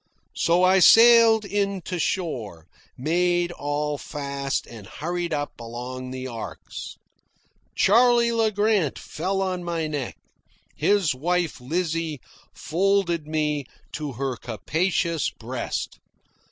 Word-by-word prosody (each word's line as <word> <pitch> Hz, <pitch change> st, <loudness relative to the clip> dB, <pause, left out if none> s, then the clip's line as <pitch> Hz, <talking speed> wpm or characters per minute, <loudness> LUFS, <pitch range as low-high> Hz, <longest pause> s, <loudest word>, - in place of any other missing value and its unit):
So 175 Hz, +2 st, +2 dB
I 185 Hz, +1 st, +5 dB
sailed 225 Hz, +1 st, +7 dB
in 200 Hz, -2 st, -1 dB
to 180 Hz, -2 st, -4 dB
shore, 120 Hz, -, -3 dB, 0.3 s
made 175 Hz, +4 st, +1 dB
all 145 Hz, -1 st, -2 dB
fast, 140 Hz, -2 st, -3 dB
and 110 Hz, -4 st, -11 dB
hurried 175 Hz, +3 st, -4 dB
up 145 Hz, -1 st, -2 dB
among 125 Hz, +2 st, -6 dB
the 130 Hz, 0 st, -6 dB
arks. 115 Hz, -3 st, -7 dB, 0.8 s
Charley 235 Hz, +2 st, +4 dB
Le 225 Hz, -1 st, +2 dB
Grant 205 Hz, -7 st, +1 dB
fell 195 Hz, +4 st, -2 dB
on 185 Hz, -2 st, -2 dB
my 170 Hz, -2 st, -2 dB
neck. 145 Hz, -5 st, -4 dB, 0.6 s
His 200 Hz, -8 st, +2 dB
wife, 170 Hz, +1 st, -1 dB
Lizzie, 160 Hz, +1 st, -2 dB, 0.3 s
folded 175 Hz, -3 st, 0 dB
me 150 Hz, -2 st, -1 dB, 0.3 s
to 150 Hz, -3 st, -4 dB
her 130 Hz, 0 st, -3 dB
capacious 165 Hz, -, -1 dB
breast. 120 Hz, +2 st, -5 dB
165 Hz, 115 wpm, -24 LUFS, 140-190 Hz, 0.8 s, sailed